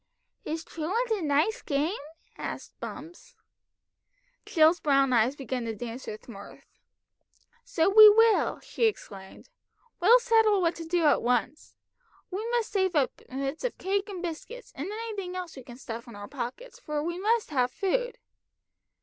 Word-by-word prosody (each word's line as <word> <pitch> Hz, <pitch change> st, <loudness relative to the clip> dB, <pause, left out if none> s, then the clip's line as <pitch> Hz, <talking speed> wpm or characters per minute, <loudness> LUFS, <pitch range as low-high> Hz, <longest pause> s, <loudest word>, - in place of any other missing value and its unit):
"Is 320 Hz, +1 st, -3 dB
truant 395 Hz, +12 st, -3 dB
a 425 Hz, -3 st, 0 dB
nice 315 Hz, +10 st, +1 dB
game?" 300 Hz, +7 st, -1 dB, 0.4 s
asked -, -, -6 dB
Bumps. 350 Hz, +11 st, -9 dB, 1.1 s
Jill's 325 Hz, +1 st, +4 dB
brown 275 Hz, -3 st, +3 dB
eyes 240 Hz, +3 st, +3 dB
began 260 Hz, -3 st, -4 dB
to 225 Hz, -1 st, -4 dB
dance 240 Hz, +3 st, -7 dB
with 215 Hz, -, -8 dB
mirth. 200 Hz, -4 st, -12 dB, 1.0 s
"So 325 Hz, 0 st, +1 dB
we 425 Hz, +2 st, +10 dB
will," 450 Hz, +1 st, +4 dB
she 465 Hz, -, -1 dB
exclaimed. 200 Hz, -, -5 dB, 0.5 s
"We'll 430 Hz, +8 st, +7 dB
settle 450 Hz, -4 st, +3 dB
what 340 Hz, -2 st, +1 dB
to 330 Hz, -, -7 dB
do 340 Hz, +1 st, 0 dB
at 290 Hz, -, +4 dB
once. 250 Hz, +4 st, -1 dB, 0.6 s
We 425 Hz, +5 st, -3 dB
must 475 Hz, -2 st, -1 dB
save 380 Hz, -3 st, 0 dB
up 280 Hz, -3 st, +2 dB
bits 275 Hz, -, -4 dB
of -, -, -2 dB
cake 400 Hz, +2 st, -1 dB
and 370 Hz, -3 st, -6 dB
biscuits, 365 Hz, +9 st, -7 dB
and 295 Hz, +8 st, -5 dB
anything 420 Hz, -4 st, -5 dB
else 360 Hz, -2 st, -6 dB
we 265 Hz, -, -9 dB
can 240 Hz, 0 st, -12 dB
stuff 235 Hz, -2 st, -7 dB
in 235 Hz, -, -11 dB
our 205 Hz, 0 st, -8 dB
pockets, 290 Hz, -, -7 dB
for 300 Hz, -10 st, -3 dB
we 345 Hz, +2 st, -3 dB
must 440 Hz, -1 st, +1 dB
have 255 Hz, -3 st, +2 dB
food." -, -, -1 dB
335 Hz, 160 wpm, -28 LUFS, 270-430 Hz, 1.1 s, we